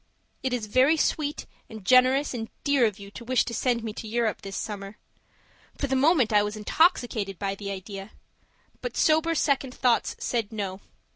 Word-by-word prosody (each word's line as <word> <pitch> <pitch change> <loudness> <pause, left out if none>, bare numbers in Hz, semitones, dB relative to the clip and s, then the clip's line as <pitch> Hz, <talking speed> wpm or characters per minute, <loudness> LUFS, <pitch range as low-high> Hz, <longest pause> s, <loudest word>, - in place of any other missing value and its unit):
It 260 - -1
is 245 -3 -2
very 260 +9 +4
sweet 300 -1 -1 0.2
and 220 -4 -10
generous 255 +4 +4
and 225 -2 -5
dear 280 -5 +4
of 210 -2 -5
you 200 -1 -11
to 235 - -9
wish 255 +1 +2
to 235 - -5
send 235 0 0
me 220 -2 -4
to 220 - -7
Europe 230 0 -1
this 195 0 -6
summer 200 -1 -6 0.8
for - - -1
the 265 -1 0
moment 265 -5 +3
I 210 - +6
was 210 +1 -3
intoxicated 215 - +1
by 195 +1 -2
the 200 0 -6
idea; 195 +1 -7 0.7
but - - -5
sober 320 +1 +3
second 270 -4 0
thoughts 245 -2 +1
said 230 -4 -2
no. 195 -3 -4
235 Hz, 185 wpm, -26 LUFS, 205-265 Hz, 0.8 s, I